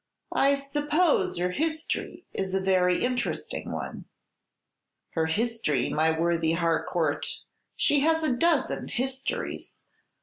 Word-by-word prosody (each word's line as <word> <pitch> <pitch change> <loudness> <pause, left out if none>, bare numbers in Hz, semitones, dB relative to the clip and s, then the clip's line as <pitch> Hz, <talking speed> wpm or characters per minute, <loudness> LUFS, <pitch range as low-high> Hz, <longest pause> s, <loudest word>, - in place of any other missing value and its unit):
"I 275 +1 +4
suppose 295 - +1
her 180 +1 0
history 320 - -2
is 190 -1 -2
a - - +3
very 185 -1 +2
interesting 245 0 -2
one." - - -5 1.1
"Her 160 -1 0
history, 205 - 0
my 160 +1 +3
worthy 165 -1 +2
Harcourt! 165 -2 0 0.5
She 290 - +3
has 320 +2 +2
a 265 -5 +2
dozen 325 +3 +1
histories. 265 - -3
235 Hz, 110 wpm, -27 LUFS, -, 1.1 s, I